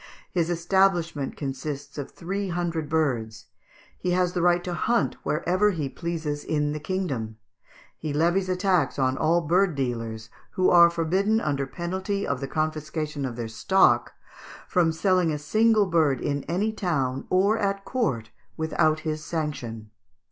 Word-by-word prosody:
His 170 -2 0
establishment 175 -4 +1
consists 140 0 -5
of 140 - -5
three 195 +3 -4
hundred 170 -3 -2
birds; 120 -9 -1 0.5
he 180 0 0
has 180 -1 +1
the 180 - 0
right 175 0 +3
to 180 - -3
hunt 235 +8 +1
wherever 180 +6 +1
he 155 -8 -2
pleases 155 -1 -4
in 150 -1 0
the 150 - -3
kingdom; 145 - -3 0.6
he 155 - -3
levies 175 +5 +1
a 185 - +1
tax 180 -6 +1
on 130 -1 +1
all 165 +4 +2
bird 175 +2 +2
dealers, 115 -4 -3 0.2
who 185 - +3
are 170 -1 +8
forbidden, 185 +6 +1
under 140 -6 -1
penalty 190 +6 -3
of 140 -2 -1
the 135 - -4
confiscation 155 -1 -2
of 125 -3 -4
their 115 -1 -4
stock, 190 +13 +3 0.5
from 175 -3 +2
selling 180 0 +2
a 150 - -1
single 215 +8 +3
bird 160 -7 +2
in 140 -1 -2
any 200 +7 0
town 135 -10 -1
or 200 +4 +3
at 195 -1 -1
court 125 - -1 0.3
without 155 -1 +1
his 155 -1 -3
sanction." 120 -10 -4
160 Hz, 155 wpm, -25 LUFS, 140-185 Hz, 0.6 s, are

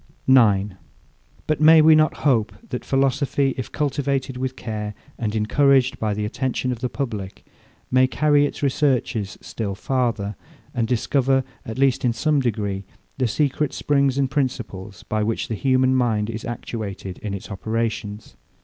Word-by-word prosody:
9. 105 -7 +4 0.7
But 155 -1 -1
may 160 +1 +8
we 155 +1 +7
not 155 0 +4
hope, 115 -7 +3 0.2
that - - -4
philosophy, 135 0 +1
if 130 - -5
cultivated 140 -2 -1
with 130 +1 -3
care, 105 -2 -5 0.2
and 110 -2 -2
encouraged 130 +4 +3
by 105 -2 -1
the 105 0 -2
attention 130 +3 -2
of 120 - -4
the 125 - -2
public, 110 -9 -5 0.5
may 130 0 +5
carry 145 +1 +3
its - - -8
researches 130 -7 0
still 100 -4 -4
farther, 115 -4 -1 0.4
and 115 -2 0
discover, 130 +2 +1 0.2
at 110 - -5
least 135 -1 +2
in 120 -2 +2
some 150 +5 +1
degree, 105 -6 -2 0.4
the 130 - +2
secret 145 +4 0
springs 140 -2 +1
and 135 -1 +1
principles, 110 -8 -3
by 110 0 -2
which 110 +1 -1
the - - -1
human 130 +2 +2
mind 115 -4 +1
is 110 0 -6
actuated 105 -6 -6
in 100 -2 -4
its 100 +2 -8
operations? 110 0 -3
125 Hz, 155 wpm, -22 LUFS, 110-135 Hz, 0.7 s, may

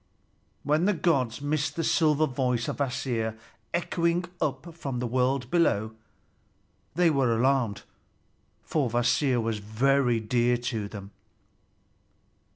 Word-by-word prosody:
When 150 +4 +2
the 205 0 +2
gods 140 -7 0
missed 145 -1 -1
the 165 - -1
silver 155 -1 +3
voice 125 -3 -1
of - - -3
Kvasir 120 -5 -2 0.3
echoing 170 +1 0 0.2
up 160 +3 -2
from 140 -6 -5
the 125 - -2
world 125 +1 0
below, 110 - +2 1.0
they 175 -1 +4
were 130 -5 +2
alarmed, 125 -4 +1 0.8
for 145 -6 0
Kvasir 120 +2 +2
was 115 -1 -1
very 120 +3 +2
dear 120 +2 +1
to 115 -4 -3
them. 100 -1 -9
130 Hz, 120 wpm, -27 LUFS, 115-150 Hz, 1.0 s, they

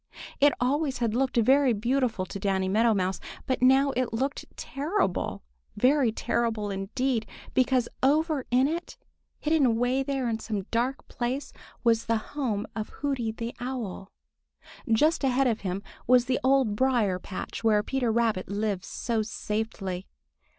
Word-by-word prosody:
It 290 +1 +6
always 275 +2 +1
had 235 -3 0
looked 260 +1 0
very 265 +2 +5
beautiful 235 -2 0
to 200 - -7
Danny 190 -1 0
Meadow 220 +3 +3
Mouse, 190 0 0 0.3
but 260 - -1
now 265 +2 +5
it 255 -2 -1
looked 265 +5 -2
terrible, 290 - -1 0.3
very 255 +2 +3
terrible 220 -2 -1
indeed, 225 +4 -1 0.3
because 255 -2 +2
over 300 0 +2
in 255 +2 +4
it, 335 +3 -4 0.5
in 260 -4 +1
some 210 -3 -3
dark 245 +3 -1
place, 255 +4 -3 0.3
was 230 -1 +2
the 230 0 +2 0.2
home 230 -8 -1
of 220 -1 -4
Hooty 265 -6 -2
the 230 +1 -5
Owl. 240 -7 -5 0.8
Just 300 +8 +3
ahead 270 0 +3
of 230 -3 +1
him 190 +1 -3 0.2
was 250 0 +5
the 255 0 0
Old 260 -5 +3
Briar 230 -7 +2
patch 185 +4 -6
where 210 -2 +4
Peter 255 -2 0
Rabbit 220 -5 +1
lives 200 -2 -2
so 230 -2 -1
safely. 210 -4 -3
240 Hz, 140 wpm, -27 LUFS, 215-265 Hz, 0.8 s, It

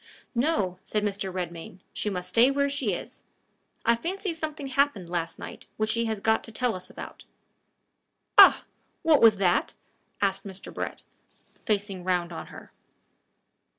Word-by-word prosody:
"No," 235 - 0
said 210 -1 -1
Mr. 200 -2 -2
Redmain; 175 -1 -6
"she 210 - -2
must 180 -2 -4
stay 230 +7 +5
where 280 0 +1
she 275 -7 0
is. - - -7 0.6
I 235 - +5
fancy 370 - -3
something 310 -3 -5
happened 265 -10 0
last 165 -2 -2
night - - -9
which 215 0 +1
she 230 0 +1
has 220 -2 -2
got 220 +2 +2
to 225 - -8
tell 245 +1 0
us 185 0 -7
about." - - -10 1.1
"Ah! - - +8 0.4
What 315 -3 +5
was 225 -2 +8
that?" 185 -3 +1 0.4
asked 195 -1 0
Mr. 195 -1 -7
Brett, - - -5 0.6
facing 200 -3 -1
round 175 -2 0
on - - -7
her. - - -12
210 Hz, 150 wpm, -27 LUFS, 185-260 Hz, 1.1 s, Ah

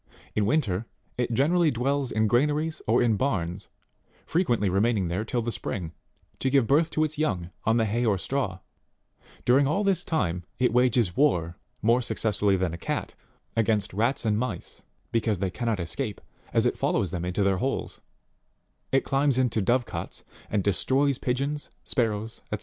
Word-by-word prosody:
In 105 -2 +1
winter, 115 - 0 0.3
it 120 -1 -1
generally 160 +8 +3
dwells 135 +1 0
in 110 0 +2
granaries 150 +8 +1
or 120 +3 +4
in 115 -3 +2
barns, 95 -8 -2 0.6
frequently 120 - +1
remaining 100 0 +1
there 90 +5 -1
till 120 +1 -2
the 120 - -2
spring, 90 -7 -4 0.5
to 135 - +1
give 135 -2 +4
birth 150 +7 +3
to 155 - +1
its 155 -1 -3
young, 90 - -1
on 115 +1 +3
the 115 - +3
hay 115 +3 0
or 105 -4 +2
straw; 100 -4 -2 0.8
during 135 +3 +5
all 195 +8 +1
this 190 -3 +2
time 90 - -1
it 125 -3 +2
wages 120 -7 +3
war, 85 - +2 0.3
more 115 +3 +4
suc 120 - -4
cessfully 105 -3 +2
than 90 -3 -1
a 85 - -6
cat, - - -3 0.4
against 110 -4 +1
rats 115 +5 0
and 105 -1 +2
mice, 115 -8 -5 0.3
because 110 -3 +1
they 95 0 -1
cannot 115 -1 -1
escape, 85 -1 -4 0.3
as - - +2
it - - 0
follows 90 - +1
them 85 -2 -3
into 90 +3 0
their 95 -1 +2
holes; 135 +8 -3 0.9
it 135 - +3
climbs, 135 -1 +2
into 125 -4 +2
dove 120 +5 +2
cots, 85 -6 -6 0.3
and 100 -2 0
destroys 130 +8 +1
pigeons, 140 +4 -2 0.2
sparrows, 110 -2 -1
&c. - - -2
115 Hz, 170 wpm, -27 LUFS, 100-135 Hz, 0.9 s, during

